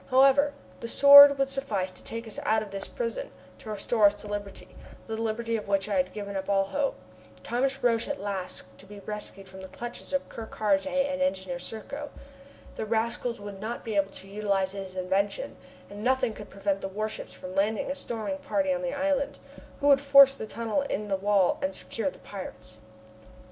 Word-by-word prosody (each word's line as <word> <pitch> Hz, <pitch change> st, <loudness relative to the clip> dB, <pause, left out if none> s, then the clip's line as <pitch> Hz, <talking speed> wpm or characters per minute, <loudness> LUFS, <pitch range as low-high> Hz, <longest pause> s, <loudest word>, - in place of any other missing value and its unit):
However, 275 Hz, +2 st, +5 dB, 0.3 s
the 230 Hz, -, -5 dB
Sword 280 Hz, +2 st, +10 dB
would 275 Hz, 0 st, +2 dB
suffice 225 Hz, -9 st, -2 dB
to 185 Hz, -, -13 dB
take 230 Hz, +1 st, -5 dB
us 220 Hz, -, -5 dB
out 220 Hz, 0 st, +2 dB
of 205 Hz, -, -11 dB
this 195 Hz, 0 st, -4 dB
prison, -, -, -4 dB, 0.3 s
to 220 Hz, -, -10 dB
restore 210 Hz, +1 st, +3 dB
us 200 Hz, -, +1 dB
to 205 Hz, -, -10 dB
liberty 205 Hz, -1 st, -6 dB, 0.4 s
that 220 Hz, 0 st, -4 dB
liberty 230 Hz, +1 st, -1 dB
of 215 Hz, -, -4 dB
which 195 Hz, 0 st, +1 dB
I 210 Hz, -, -2 dB
had 185 Hz, 0 st, +1 dB
given 200 Hz, -1 st, -6 dB
up 190 Hz, 0 st, -4 dB
all 195 Hz, -1 st, +3 dB
hope. 275 Hz, +8 st, -1 dB, 0.5 s
Thomas 265 Hz, +3 st, -1 dB
Roch 240 Hz, -1 st, +5 dB
was 230 Hz, -, -4 dB
at 290 Hz, -, -3 dB
last 195 Hz, -3 st, -4 dB, 0.2 s
to 195 Hz, -, -13 dB
be 205 Hz, 0 st, -10 dB
rescued 210 Hz, -2 st, -7 dB
from 190 Hz, 0 st, -11 dB
the 190 Hz, -, -8 dB
clutches 240 Hz, +4 st, -7 dB
of 280 Hz, -1 st, -1 dB
Ker 225 Hz, -1 st, -8 dB
Karraje 205 Hz, +1 st, +1 dB
and 275 Hz, 0 st, 0 dB
Engineer 190 Hz, -10 st, -1 dB
Serko. 250 Hz, +10 st, -6 dB, 0.7 s
The -, -, -2 dB
rascals 235 Hz, +1 st, -1 dB
would 205 Hz, -1 st, -8 dB
not 230 Hz, +3 st, -4 dB
be 220 Hz, -2 st, -3 dB
able 195 Hz, -1 st, +2 dB
to 195 Hz, -, -10 dB
utilize 195 Hz, -2 st, 0 dB
his 190 Hz, -1 st, -7 dB
invention, 195 Hz, -, -1 dB, 0.3 s
and 205 Hz, +1 st, -9 dB
nothing 255 Hz, -2 st, +2 dB
could 210 Hz, -1 st, -10 dB
prevent 195 Hz, 0 st, -2 dB
the -, -, -3 dB
warships 215 Hz, +3 st, -5 dB
from 185 Hz, 0 st, -9 dB
landing 210 Hz, +6 st, 0 dB
a -, -, 0 dB
storming 260 Hz, +1 st, -4 dB
party 285 Hz, 0 st, 0 dB
on 270 Hz, -, -2 dB
the 270 Hz, +1 st, -2 dB
island, 280 Hz, -1 st, 0 dB, 0.4 s
who 285 Hz, -, +2 dB
would 275 Hz, -1 st, +6 dB
force 275 Hz, -1 st, +8 dB
the 220 Hz, -5 st, -7 dB
tunnel 230 Hz, +4 st, -1 dB
in 210 Hz, -7 st, -3 dB
the 195 Hz, -, +2 dB
wall 195 Hz, -1 st, +2 dB
and 190 Hz, 0 st, -1 dB
secure 230 Hz, +8 st, -3 dB
the -, -, -13 dB
pirates! 110 Hz, -, -9 dB
215 Hz, 205 wpm, -28 LUFS, 195-270 Hz, 0.7 s, Sword